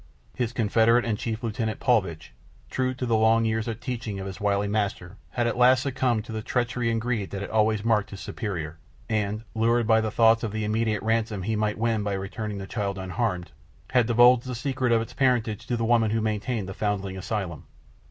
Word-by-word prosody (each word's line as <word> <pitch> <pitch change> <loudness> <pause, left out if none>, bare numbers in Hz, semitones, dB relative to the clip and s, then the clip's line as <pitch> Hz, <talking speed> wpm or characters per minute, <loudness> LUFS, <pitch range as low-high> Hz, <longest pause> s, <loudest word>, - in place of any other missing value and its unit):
His 120 -2 -2
confederate 115 +1 +3
and 115 -2 0
chief 115 +2 -4
lieutenant, 110 -1 -2
Paulvitch, 95 - 0 0.4
true 130 0 0
to 125 - -3
the 115 -2 +2
long 110 +1 +4
years 110 0 -1
of 115 -1 -4
teaching 120 -5 -4
of 95 - -5
his 95 0 -7
wily 100 0 +1
master, 100 -3 -2
had 120 - -1
at 120 +1 -1
last 125 +1 +5
succumbed 125 -5 0
to - - -8
the 110 -1 -3
treachery 120 +1 -1
and 115 0 +1
greed 115 -4 -2
that 100 - -5
had 100 - -5
always 110 -1 +2
marked 105 -3 +2
his 100 - -8
superior, 85 -10 -5 0.3
and, 105 0 -1
lured 115 +1 +2
by 110 0 +4
the 110 - -1
thoughts 115 +1 +4
of 110 -3 -3
the 110 0 -2
immense 110 0 0
ransom 110 -2 0
that - - -6
he 110 +1 0
might 105 0 0
win 115 -1 +1
by 100 -1 -1
returning 100 +2 -4
the 95 - -5
child 100 -2 -3
unharmed, 95 -1 -2 0.4
had 125 -3 +3
divulged 120 +1 +5
the 125 - -3
secret 130 0 -1
of 115 -1 +3
its - - -11
parentage 120 -5 +1
to 120 - 0
the 115 - -1
woman 115 -1 +3
who 115 +1 0
maintained 110 -1 -2
the 95 - -5
foundling 100 -2 -2
asylum. 95 -5 -4
110 Hz, 215 wpm, -26 LUFS, 105-120 Hz, 0.4 s, last